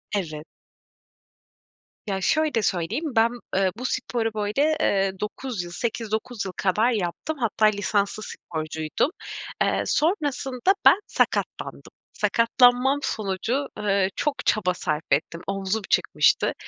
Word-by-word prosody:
Evet. 155 -6 -3 1.6
Ya, 195 -1 -2
şöyle 300 - +2
söyleyeyim. 185 - -1
Ben, 225 +1 +5 0.3
eee, 190 -1 +3
bu 250 - -5
sporu, 230 -3 -1
böyle, 215 +9 +1
eee, 195 -1 +2
9 210 0 -4
yıl, 175 - -9
8-9 225 +1 -3
yıl 190 - -4
kadar 210 +6 +2
yaptım. 215 - -2
Hatta 220 -2 +1
lisanslı 205 0 +1
sporcuydum. 155 - -3 0.5
Eee, - - +2
sonrasında 295 - +1
ben - - +8
sakatlandım. - - -1 0.3
Sakatlanmam 245 +3 +3
sonucu, 220 +7 -1
eee, 200 -2 +1
çok 290 -1 -2
çaba 185 -4 +2
sarf 155 -3 -2
ettim. 165 +3 0
Omzum 195 +2 -1
çıkmıştı. - - +3
215 Hz, 115 wpm, -25 LUFS, 190-250 Hz, 1.6 s, ben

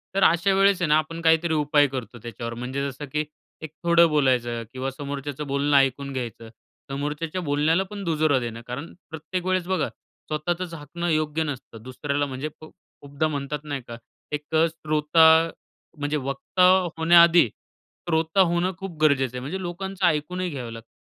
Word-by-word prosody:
तर 195 - +3
अशा 170 +4 +4
वेळेस 195 -1 +3
आहे 170 - +2
ना 150 - +5
आपण 165 +2 -3
काहीतरी 160 0 +3
उपाय 150 -1 +3
करतो 130 -3 -6
त्याच्यावर, 115 0 -6
म्हणजे 130 +4 -3
जसं 140 +2 -8
की 150 +2 -1 0.4
एक 160 -2 -7
थोडं 170 0 +6
बोलायचं 125 -6 +1
किंवा 130 +1 -3
समोरच्याचं 145 +1 -5
बोलणं 140 +1 +2
ऐकून 140 +1 +1
घ्यायचं, 115 -3 -6 0.4
समोरच्याच्या 150 +5 -3
बोलण्याला 155 +3 +2
पण 205 -1 -6
दुजोरा 155 -5 +2
देणं, 115 -1 -5
कारण 140 +7 -6 0.2
प्रत्येक 160 +3 -5
वेळेस 185 -1 0
बघा 190 0 0 0.4
स्वतःचंच 170 +3 -2
हाकणं 165 +3 -5
योग्य 155 0 0
नसतं, 130 -6 -7
दुसऱ्याला 140 +3 -2
म्हणजे 135 +2 -5
खु 155 - -12 0.3
खूपदा 145 +2 -2
म्हणतात 145 -1 -4
नाही 145 -3 -4
का 115 - -7 0.3
एक 150 +2 -4
अ, 160 +1 +5
श्रोता, 160 +1 +4 0.5
म्हणजे 145 +1 -1
वक्ता 140 +6 -1 0.3
होण्याआधी 170 -1 +6 0.6
श्रोता 160 +3 +2
होणं 175 0 +2
खूप 190 -3 -7
गरजेचं 135 -5 +3
आहे, - - -3
म्हणजे 155 +9 -4
लोकांचं 190 +2 -3
ऐकूनही 175 +3 0
घ्यावं 125 -7 -6
लागतं. 115 0 -10
150 Hz, 165 wpm, -24 LUFS, 140-170 Hz, 0.6 s, थोडं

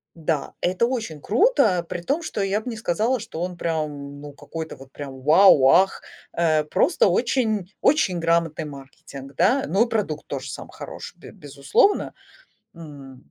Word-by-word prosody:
Да, 160 -3 -2
это 185 +6 +1
очень 230 - -4
круто, 215 - +2
при 175 - -4
том, 280 - -1
что 265 - -4
я 195 +1 0
бы 245 - -6
не 230 - -6
сказала, 220 +5 0
что 215 -7 -7
он 180 0 -4
прям, 150 -4 -4
ну, 145 0 -9
какой-то 160 +3 -8
вот 135 0 -15
прям 135 -2 -8
"Вау!" 155 -1 +6
"Ах", 190 +5 +3 0.3
э, 160 -2 +2
просто 150 - +2
очень 215 -2 0
очень 195 - +2
грамотный 165 -1 0
маркетинг, 135 -1 -11
да. 245 - +2
Ну 200 +7 +2
и - - -13
продукт 190 -9 -2
тоже - - -5
сам - - -8
хороший, - - -9
без - - -12
безусловно. 140 - +1 0.6
М, 140 -6 -12
170 Hz, 160 wpm, -23 LUFS, 145-215 Hz, 0.6 s, Вау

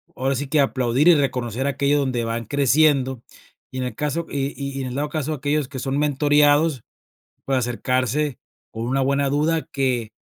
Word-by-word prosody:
ahora 135 +1 0
sí 140 +2 -3
que, 150 +2 +1
aplaudir 130 +2 +1
y 175 - +9
reconocer 130 -2 -1
aquello 140 +1 +1
donde 130 -4 -1
van 115 0 -3
creciendo. 140 -1 +2 0.5
Y 130 - -7
en - - -1
el 125 - -5
caso 150 +3 -2
y 140 -1 -1
y 140 -1 -5
y - - -2
en 130 - -3
el 125 - -6
dado 145 +1 -2
caso 155 -1 -3
de 150 - -2
aquellos 145 0 -1
que 135 -2 -6
son 135 +2 -2
mentoreados, 145 -1 +3 0.6
pues, 135 -1 +1
acercarse 130 +3 -1 0.3
con 115 +1 -4
una 135 +2 0
buena 140 +1 +1
duda 155 +3 0
que 125 -5 -1
140 Hz, 195 wpm, -22 LUFS, 130-145 Hz, 0.6 s, y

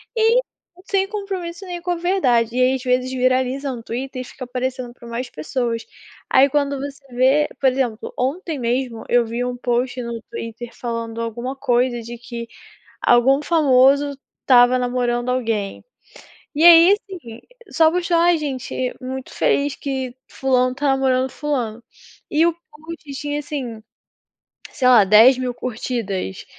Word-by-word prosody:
e 460 +2 +4 0.4
sem 390 -1 0
compromisso, 390 -4 -5
nenhum 350 -2 -6
com 355 +1 -2
a - - +1
verdade. 255 - +1
E 255 - +2
aí, 255 +1 +4
às 260 - -6
vezes 255 0 0
viraliza 260 +2 0
um 240 -2 -7
Twitter 255 +3 -5
e - - -5
fica 255 - -10
aparecendo 250 0 -4
para 235 - -14
mais 235 +2 -4
pessoas. 230 - -3 0.4
Aí, 270 +2 +5
quando 280 0 0
você 280 +1 -7
vê 270 +4 +3
por 270 - +4
exemplo, 250 -4 -3
ontem 300 +3 -2
mesmo 240 -1 -2
eu 245 -1 +3
vi 235 +2 -3
um 250 - -3
post 245 +1 -1
no 235 -1 -5
Twitter 230 +1 -7
falando 230 -1 -5
alguma 235 +3 -4
coisa 245 -2 0
de 235 +1 -8
que 235 -1 -8 0.5
algum 260 +4 +4
famoso 280 -2 +3 0.2
estava 250 0 +5
namorando 245 0 -1
alguém. 225 -6 -2 0.7
E 315 +3 +3
aí, 340 +2 +9
assim, 350 - -7 0.3
só 320 -1 +4
postou: 350 0 0
"Ah, 345 +1 +4
gente, 260 -4 -3
muito 260 0 -7
feliz 285 0 +1
que 265 -3 -4
fulano 255 -1 +1
está 285 +2 -2
namorando 265 -1 +1
fulano" 245 -6 -3 0.5
e 315 +2 +3
o 340 - +3
post 320 -2 -13
tinha, 290 +1 -3
assim, 260 -7 -5 0.9
sei 255 - -1
lá, 240 -5 +7
10.000 245 +5 +5
curtidas, 220 - -4
255 Hz, 150 wpm, -20 LUFS, 240-290 Hz, 0.9 s, aí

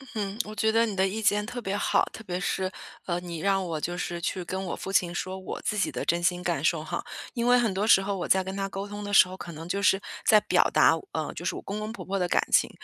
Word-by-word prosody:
嗯， 205 -1 -3
我 215 - -8
觉 220 +1 +2
得 230 +1 +4
你 215 -3 -4
的 190 0 +3
意 210 +4 -3
见 210 -1 +2
特 245 +3 -5
别 195 -3 -2
好。 205 - +2
特 220 - -9
别 180 -3 -3
是， 185 0 -1 0.3
呃， 175 -1 -1
你 175 -2 -6
让 195 +2 +1
我 160 -3 -3
就 175 +2 -2
是 175 -1 -3
去 180 +1 -2
跟 190 +2 -3
我 - - -2
父 195 - -6
亲 175 -2 +2
说 185 +2 -3
我 190 - -6
自 210 - -2
己 200 - +1
的 - - -4
真 170 +1 +1
心 175 +1 +1
感 170 -5 -1
受 160 -1 +2
哈。 - - -4 0.3
因 235 -1 -1
为 245 0 +6
很 230 -5 +1
多 195 +2 0
时 205 -3 +6
候， 200 +1 -2
我 180 - -3
在 190 0 +3
跟 190 +1 -5
他 195 0 -2
沟 195 +1 -5
通 205 0 -7
的 205 0 -5
时 190 - +8
候， 185 - -8
可 175 - -8
能 165 +1 -8
就 200 +3 -1
是 195 -1 +4 0.3
在 215 - +7
表 - - +3
达， - - +6 0.2
呃， - - -3
就 - - -6
是 - - -1
我 - - -6
公 205 +2 -5
公 215 +1 -4
婆 235 - -8
婆 195 +1 -2
的 180 -2 0
感 - - +3
情， - - +4
195 Hz, 320 characters per minute, -27 LUFS, 180-205 Hz, 0.3 s, 时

